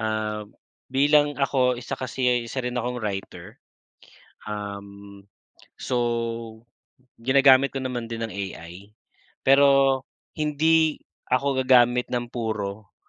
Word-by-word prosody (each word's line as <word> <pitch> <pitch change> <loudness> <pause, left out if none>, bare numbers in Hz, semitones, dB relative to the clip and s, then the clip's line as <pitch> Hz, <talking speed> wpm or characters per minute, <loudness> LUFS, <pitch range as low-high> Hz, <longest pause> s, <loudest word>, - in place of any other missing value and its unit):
Ah, 110 -1 -2 0.5
bilang 145 +2 +3
ako 130 -3 +1
isa 120 - -5
kasi 130 0 -3
ay 125 -1 +3
isa - - -4
rin 125 - -3
akong 125 0 -2
writer, 100 -3 -6 0.8
um, 100 -1 -8 0.5
so 115 -2 -3 0.5
ginagamit 135 +2 +4
ko 135 - -3
naman 125 -3 -4
din 115 0 -6
ang 115 - -3
AI. 95 0 -8 0.5
Pero 135 -1 +4 0.4
hindi 155 +1 +2 0.3
ako 130 +1 0
gagamit 125 -1 +4
ng 120 -1 -2
puro, 110 -4 -5
120 Hz, 110 wpm, -24 LUFS, 110-135 Hz, 0.8 s, ginagamit